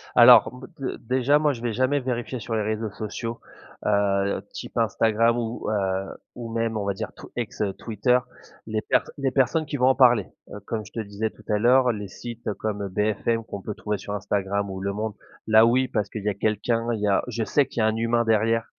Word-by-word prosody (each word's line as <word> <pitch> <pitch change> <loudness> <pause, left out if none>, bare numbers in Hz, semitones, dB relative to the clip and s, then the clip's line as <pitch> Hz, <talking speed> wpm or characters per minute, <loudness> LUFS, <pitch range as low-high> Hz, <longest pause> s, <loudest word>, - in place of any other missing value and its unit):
Alors, - - +8
b 125 +1 -10
d 135 - -3
déjà, 130 +4 +2
moi, 150 -1 +2
je 115 - -9
vais 120 -2 -2
jamais 130 +5 +2
vérifier 125 -1 -3
sur 115 +1 -4
les 110 - +1
réseaux 110 0 -2
sociaux, 115 +3 -5 0.5
heu, 100 -1 +1
type - - -8
Instagram 115 +1 +2
ou, 115 -2 -3
heu, 95 -2 -1 0.2
ou 115 -2 -7
même, 115 -1 -1
on 100 - -2
va 100 - 0
dire 110 +3 -5
t - - -15
ex, 120 -4 -4
heu, 100 -2 0
Twitter. 115 +4 +1 0.5
Les 110 -1 -1
per - - +2 0.2
les 135 -2 0
personnes 140 +5 +2
qui 145 0 -4
vont 125 0 +3
en 130 - +5
parler. 120 -7 +5 0.2
Heu, 105 - -7
comme 110 -2 -3
je - - -14
te - - -5
disais 105 +1 -3
tout 110 - -19
à 105 - +2
l'heure, 125 +2 +5
les 105 -3 -5
sites 115 +3 -6
comme 100 -1 -3
BFM 110 +3 0
qu'on 100 -3 -7
peut 105 +1 -5
trouver 105 -1 -3
sur 100 +1 -6
Instagram 100 0 -1
ou 95 0 -6
Le 100 0 -2
Monde, 110 +1 -3 0.3
là, 110 +1 +7
oui, 130 +3 +3
parce 105 -3 -2
qu'il 110 - -6
y 105 - +1
a - - 0
quelqu'un, 110 +3 0
il 110 - -3
y 105 - +1
a 100 - +2
je 115 -2 -2
sais 145 +5 +2
qu'il 115 - -3
y - - +3
a 110 - +4
un 110 - +1
humain 115 +1 +1
derrière 115 +1 +2
110 Hz, 235 wpm, -25 LUFS, 105-120 Hz, 0.5 s, Alors